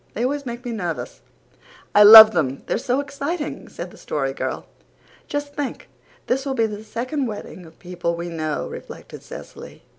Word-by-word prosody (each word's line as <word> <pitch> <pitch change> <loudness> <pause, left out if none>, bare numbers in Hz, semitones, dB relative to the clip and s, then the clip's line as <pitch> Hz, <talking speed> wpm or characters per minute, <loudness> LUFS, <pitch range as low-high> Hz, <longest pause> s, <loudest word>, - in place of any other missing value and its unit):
They 230 - -2
always 280 +1 -2
make 240 +1 -7
me 240 - -3
nervous." 175 -7 -5 0.7
"I 205 - +6
love 220 +1 +12
them. 140 -8 -2
They're - - -1
so 255 +1 -1
exciting," 285 +3 -5
said - - -8
the - - -16
Story 135 -2 -3
Girl. - - -4 0.6
"Just 290 0 -4
think, 285 -2 -5 0.4
this 265 +2 -1
will 275 -1 -3
be 230 -3 +2
the 210 -1 -6
second 255 +6 -3
wedding 205 -5 -8
of 160 - -19
people 175 -1 -4
we 170 +1 -5
know," 155 -3 -3
reflected - - -10
Cecily. - - -11
225 Hz, 175 wpm, -22 LUFS, 175-275 Hz, 0.7 s, love